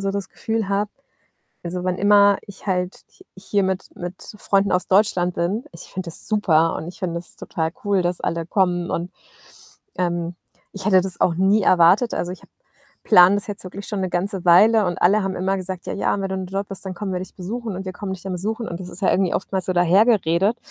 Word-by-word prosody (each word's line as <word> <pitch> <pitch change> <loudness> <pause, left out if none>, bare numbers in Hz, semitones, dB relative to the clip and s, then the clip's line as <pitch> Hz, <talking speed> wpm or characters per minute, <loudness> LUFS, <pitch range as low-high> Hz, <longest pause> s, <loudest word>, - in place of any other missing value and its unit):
so 195 0 -1
das 200 -2 -4
Gefühl 225 -3 -3
habe 200 +1 0 0.7
also, 180 +1 -4
wann 180 0 -1
immer 200 0 +5
ich 200 +1 -11
halt 180 -1 0 0.2
h 370 - -20
hier 195 +1 -1
mit 190 -1 -2
mit 175 +1 -6 0.2
Freunden 195 0 +1
aus 180 - +1
Deutschland 185 -3 +2
bin, 200 +9 -1
ich - - -10
finde 185 -3 -5
das - - +2
super 165 -7 +2
und - - -6
ich 180 +4 -10
finde 175 -3 -2
das 170 +1 -4
total 160 0 -3
cool, 200 -3 +1
dass 175 0 -1
alle 165 -1 -2
kommen. 175 -2 +1
Und, 175 +2 -3 0.9
ähm, 175 -1 -2 0.4
ich 195 -1 -7
hätte 190 -3 +5
das 185 -1 -4
auch 170 - +3
nie 195 +4 +3
erwartet. 185 +7 +4
Also, 175 - -2
ich 185 - -11
habe - - -20 0.5
plane 180 -2 +7
das 205 - -4
jetzt 205 -2 -4
wirklich 190 +2 -8
schon 210 - -3
'ne 185 -1 -2
ganze 190 +1 -2
Weile 210 +5 +6
und 175 - -2
alle 205 +4 +4
haben 195 - -2
immer 190 +2 0
gesagt: 185 -1 -5
„Ja, - - -3
ja, 200 - 0
wenn 195 - -2
du 190 - -3
im 190 -1 -4
Job 195 +2 -4
bist, 195 0 -7
dann 185 - -4
kommen 195 +2 -5
wir 180 - -1
dich 185 - -9
besuchen 215 +3 -5
und 190 - -6
wir 185 - -5
kommen 190 +1 -6
dich 185 -2 -7
dann 190 - -5
besuchen.“ 220 +6 -3
Und 170 - -5
das 180 - -7
ist 185 - -6
ja - - +3
irgendwie 185 -2 +1
oftmals 190 0 -2
so 185 - 0
dahergeredet. 190 +2 +3
190 Hz, 230 wpm, -22 LUFS, 180-200 Hz, 0.9 s, plane